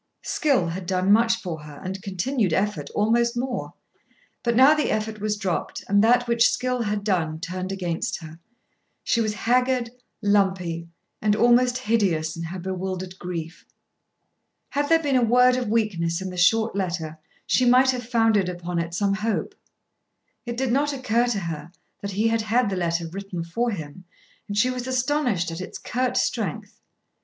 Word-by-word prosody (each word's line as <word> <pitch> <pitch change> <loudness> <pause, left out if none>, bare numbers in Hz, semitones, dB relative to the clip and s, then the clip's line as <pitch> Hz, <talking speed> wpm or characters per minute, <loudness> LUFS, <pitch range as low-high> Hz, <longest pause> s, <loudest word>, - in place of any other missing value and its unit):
Skill 285 - +1
had 175 +1 -5
done 185 +1 +1
much 225 +2 +5
for 170 -8 -6
her 150 -1 -11
and 190 +1 -5
continued 195 +1 -1
effort 165 -6 -1
almost 235 +3 +2
more. 250 0 -3 0.7
But 235 -1 0
now 265 +5 +7
the 305 -1 0
effort 215 0 -2
was 210 0 -1
dropped 190 -4 -3
and 200 +1 +4
that 245 +2 +4
which 235 0 +4
skill 250 +1 -1
had 210 -2 -1
done 165 -6 0
turned 185 +1 -4
against 175 -4 -2
her. 160 0 -11 0.6
She 230 - +1
was 215 -1 -1
haggard, 250 +1 +1 0.3
lumpy, 190 -5 +1 0.3
and 210 -1 +2
almost 245 +2 +4
hideous 195 -10 0
in 165 - -6
her 175 +3 -6
bewildered 185 0 -5
grief. 170 -2 -6 1.1
Had 285 +1 -1
there 325 0 +4
been 280 -3 +1
a 255 - +4
word 250 +2 +5
of 250 -2 -2
weakness 190 -7 0
in 190 -1 -5
the - - -8
short 220 +5 +3
letter 170 -5 -3 0.3
she 255 - +2
might 255 +2 +5
have 245 -2 -6
founded 225 -5 +3
upon 175 -1 -3
it 170 0 -3
some 200 +1 +1
hope. 215 +2 -2 0.9
It 235 0 -4
did 260 -1 0
not 285 +3 +1
occur 245 -3 +1
to 215 -5 -1
her 165 -2 -5 0.3
that 200 -1 -4
he 215 +4 +1
had 225 0 +1
had 220 0 +1
the - - -1
letter 170 -2 -1
written 185 0 -5
for 230 +9 -1
him, 180 -3 -7 0.4
and 205 - -4
she 250 +5 +3
was 250 0 -5
astonished 255 - 0
at 165 +2 -5
its 185 - -7
curt 255 +1 -1
strength. - - -2
210 Hz, 175 wpm, -24 LUFS, 180-240 Hz, 1.1 s, now